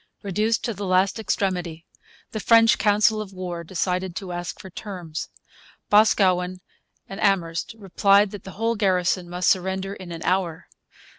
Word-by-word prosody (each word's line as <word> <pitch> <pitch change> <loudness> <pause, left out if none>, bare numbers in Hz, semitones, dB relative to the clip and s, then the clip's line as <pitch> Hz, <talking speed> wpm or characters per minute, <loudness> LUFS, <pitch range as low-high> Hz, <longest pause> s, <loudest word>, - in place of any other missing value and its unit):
Reduced 210 +3 0
to 230 - -2
the 200 0 -5
last 185 +3 +2
extremity, 180 -6 -2 0.5
the 215 - -4
French 230 +1 +5
council 215 +1 +3
of 200 -2 -8
war 180 -2 -5
decided 180 +1 -2
to 190 -2 -5
ask 175 -1 -5
for 190 - -11
terms. 175 -5 -6 0.6
Boscawen 185 -4 +3 0.5
and 195 +2 -8
Amherst 175 -2 0
replied 200 0 +3
that 205 - -9
the 190 - -9
whole 225 +1 +1
garrison 185 -3 +1
must 180 +1 -2
surrender 190 +1 0
in 185 -3 -10
an 165 -1 -6
hour. 180 -3 -1
190 Hz, 150 wpm, -24 LUFS, 180-205 Hz, 0.6 s, French